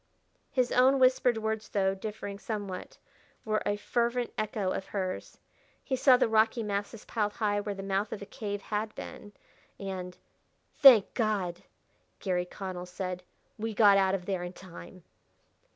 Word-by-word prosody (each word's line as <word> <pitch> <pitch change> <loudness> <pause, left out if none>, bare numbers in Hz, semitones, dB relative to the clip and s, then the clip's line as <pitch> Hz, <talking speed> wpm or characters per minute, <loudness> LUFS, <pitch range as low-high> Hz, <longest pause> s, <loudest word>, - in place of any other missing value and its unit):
His 255 -2 +1
own 260 +2 +5
whispered 255 -2 +4
words, 220 0 -3
though 195 -1 +1
differing 200 0 -6
somewhat, 205 -4 -5 0.5
were 215 -1 0
a 205 - +1
fervent 235 +2 -1
echo 210 -3 -1
of 190 - -4
hers. 185 -2 -4 0.5
He 265 - -1
saw 255 0 +6
the 245 - +3
rocky 225 +1 +3
masses 205 +1 -4
piled 210 -2 -1
high 205 -2 0
where 205 0 -4
the 195 - -6
mouth 195 +2 -1
of - - -4
a 200 - -7
cave 205 -1 -5
had 215 +1 -3
been; 205 - -9 0.5
and 185 -2 -5 0.6
"Thank 250 -8 +8
God!" 200 -7 -1 0.6
Garry 180 -2 -1
Connell 180 -1 -6
said, 180 0 -4 0.4
"we 220 0 -3
got 200 -2 +6
out 190 0 +3
of 180 -2 -5
there 190 -2 -2
in 175 0 -5
time!" 185 0 -12
205 Hz, 155 wpm, -29 LUFS, 190-220 Hz, 0.6 s, Thank